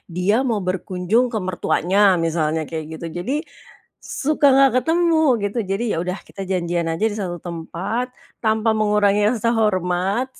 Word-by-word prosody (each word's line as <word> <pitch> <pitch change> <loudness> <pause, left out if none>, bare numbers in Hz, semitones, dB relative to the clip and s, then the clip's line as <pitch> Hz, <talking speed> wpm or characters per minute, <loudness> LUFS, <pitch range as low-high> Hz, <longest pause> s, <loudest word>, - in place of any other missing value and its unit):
dia 185 +4 +2
mau 230 -5 0
berkunjung 185 +5 0
ke 220 - -2
mertuanya 185 +1 +2
misalnya 160 -1 0
kayak 160 -1 -5
gitu - - -6 0.2
jadi 265 - -2 0.7
suka 295 0 0
gak 275 -1 +6
ketemu 335 +3 +2 0.3
gitu. 205 +4 -2
Jadi 195 +4 -1
yaudah 180 +4 -2
kita 195 - -8
janjian 175 -2 -1
aja 165 +5 -4
di 205 - -6
satu 180 -3 -3
tempat 175 +8 -3 0.4
tanpa 220 0 +2
mengurangi 210 -1 +3
rasa 230 0 0
hormat 190 +2 0
195 Hz, 145 wpm, -21 LUFS, 175-225 Hz, 0.7 s, gak